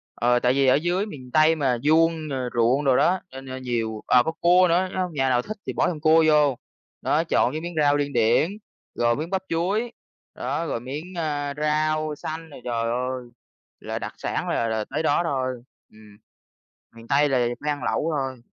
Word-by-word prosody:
Ờ, 120 +1 +2
tại 125 +1 +2
vì 135 -1 +2
ở 130 - +6
dưới 175 +6 0
miền 130 - -10
Tây 155 +1 +5
mà 130 -5 +1
vuông, 160 +1 +2
ờ, 130 -3 -3
ruộng 120 +5 +2
đồ 130 -2 +4
đó, 180 +6 +3
nên 135 0 -9
nên 130 0 -7
nhiều 115 -3 -2
ờ, 125 -1 +5
có 160 - -1
cua 175 +2 +4
nữa 170 - +3
nhá, 185 - -4
nó 185 - -1
hông 175 -3 -5
nhà 135 -2 +1
nào 125 -1 +2
thích 215 - -7
thì - - -2
bỏ - - +1
thêm 160 -4 -3
cua 160 +1 +5
vô. 150 -4 +4 0.4
Đó, 160 +3 +1
chọn 165 - +2
cái 155 - -4
miếng 175 0 -6
rau 145 0 +4
điên 145 -1 -2
điển, 120 +8 +3 0.5
rồi 120 0 +2
miếng 155 +5 -4
bắp 190 0 -1
chuối, 200 +8 -1 0.4
đó, 145 +6 -3
rồi 140 - -2
miếng, 140 +7 -6
a, 145 -3 -2
rau 155 0 0
xanh 160 +2 -6
rồi 140 - -12
trời 120 -2 -2
ơi 125 +1 -2 0.6
là - - -5
đặc - - -6
sản - - -3
là 115 - 0
là 110 -1 -2
tới 150 +4 -2
đó 145 +1 +2
thôi. 130 -5 -2 0.3
Ừm. 105 -1 -17 0.8
Miền 115 0 -13
Tây 145 +1 +3
là 130 -2 +2
về 120 0 0
phải 150 - -1
ăn 145 -1 -4
lẩu 165 - 0
thôi. 130 -3 -4
145 Hz, 220 wpm, -24 LUFS, 125-160 Hz, 0.8 s, ở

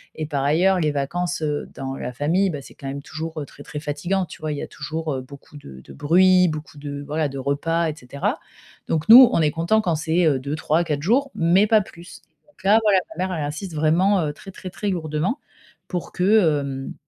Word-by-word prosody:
et 155 - -4
par 145 -3 -2
ailleurs, 180 +7 +3
les 150 - +1
vacances, 170 +5 -2
heu, 150 -1 -2
dans 135 0 -5
la 125 - -5
famille, 170 +9 +1
ben 145 -5 -5
c'est - - -14
quand 135 - -9
même 140 +1 -5
toujours 160 0 -6
très, 145 - -14
très 150 - -7
fatiguant 170 +6 -2
tu 160 - -13
vois? 155 -1 -2
Il - - -5
y - - -4
a - - -6
toujours 155 -3 -4
beaucoup 140 +2 -14
de 65 - -12
de - - -14
bruit, 180 +5 +4
beaucoup 155 -1 -7
de 145 0 -6
voilà, 150 0 -1
de 135 - -7
repas 165 +5 0
et 155 - -5
cetera. 140 +1 -3 0.5
Donc 160 +2 -1
nous, 245 +1 +11
on - - +3
est 150 -2 +2
content 170 +7 +1
quand 175 -5 0
c'est 165 +3 +1
heu 145 -4 +3
2-3-4 150 +2 -1
jours, 265 +8 +2
mais 180 +5 +3
pas 220 0 +5
plus. 175 -1 -12 0.3
Donc 295 - -24
là, 215 +3 +6
voilà 205 -3 +4 0.2
ma 185 - 0
mère, 185 -1 -3
elle 150 - -2
insiste 155 +4 -6
vraiment, 170 +6 +3
heu, 145 - -3
très, 195 +6 -12
très, 185 - -8
très 205 - -3
lourdement 170 - -2 0.5
pour 175 -3 -5
que, 180 - -2 0.4
hem, 135 -1 -5
160 Hz, 220 wpm, -22 LUFS, 145-180 Hz, 0.5 s, nous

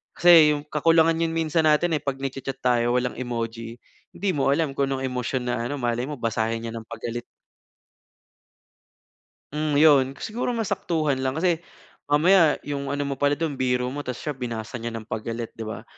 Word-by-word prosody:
Kasi 165 -4 +7
yung 145 - -6
kakulangan 165 +1 +3
yun 165 -1 0
minsan 160 0 +1
natin, 160 +2 +3
eh, - - -9
pag 140 -1 -1
nag-cha-chat 135 0 -5
tayo 120 -1 +2
walang 125 0 -1
emoji. 115 -2 -4 0.4
Hindi 195 -1 0
mo 135 -1 +2
alam 155 -2 0
kung 140 -1 +2
anong 135 -1 -2
emosyon 125 0 -2
na - - 0
ano 145 - -3
malay 120 0 -1
mo 150 - -4
basahin 115 0 -1
niya - - -5
ng 115 -1 -8
pagalit. 120 +1 -5 2.3
Hmm, 150 0 -1
yun, 140 -3 +5
siguro 235 - -3
mas 225 -3 -2
saktuhan 160 -8 0
lang. 130 0 -1
Kasi 170 0 +1 0.5
mamaya 160 +3 +5
yung 140 -1 -4
ano 145 +1 -1
mo 140 -1 -4
pala 145 0 +3
dun, 155 -3 -3
biro 125 -1 0
mo 145 - -5
tapos 125 -4 -5
siya 150 - -2
binasa 120 -2 -5
niya 115 0 -5
ng 115 - -6
pagalit 115 +1 -5
'di 110 -1 -7
ba. 110 - -6
135 Hz, 185 wpm, -24 LUFS, 120-155 Hz, 2.3 s, Kasi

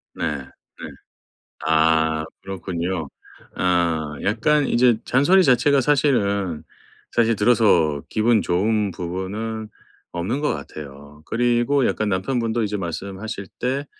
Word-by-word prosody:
네. 75 - -2
네. - - -18 1.2
아 80 0 +2 0.2
그렇군요. 90 -3 -4 0.5
어 85 -4 0
약간 140 +8 +2
이제 120 -1 +3
잔소리 160 +9 +4
자체가 135 0 +4
사실은 100 - +1 0.5
사실 115 -1 +2
들어서 105 -10 +3
기분 110 0 +2
좋은 105 +3 0
부분은 100 +6 -5 0.4
없는 90 +10 -2
것 150 - +1
같아요. 70 0 -10
그리고 120 +3 +1
약간 110 -1 -1
남편분도 115 +4 -1
이제 105 0 -2
말씀하실 95 +3 -5
때 135 +3 -1
105 Hz, 235 characters per minute, -22 LUFS, 85-120 Hz, 1.2 s, 잔소리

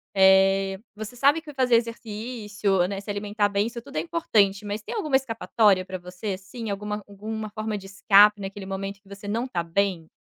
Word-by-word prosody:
eh, 195 0 +5 0.2
você 215 +2 -7
sabe 285 +5 +4
que 300 -2 -11
fazer 255 -3 +3
exercício, 215 -4 -1
né, 200 0 -4
se 205 - -12
alimentar 205 0 0
bem 200 +1 +1
isso 235 0 -7
tudo 280 +3 -9
é - - +3
importante 215 - +1
mas 205 +1 -3
tem - - -6
alguma 305 -10 0
escapatória 225 -6 +2
para 185 0 -5
você 180 +3 -5
assim 205 +4 -8
alguma 210 +1 -4
alguma 215 +2 -6
forma 215 0 -3
de 195 0 -10
escape 205 +1 +5
naquele 195 0 -6
momento 195 +1 -5
que 195 - -22
você 200 +1 -9
não 225 +4 -1
está 180 -10 -2
bem? 170 -1 -1
205 Hz, 195 wpm, -25 LUFS, 195-225 Hz, 0.2 s, eh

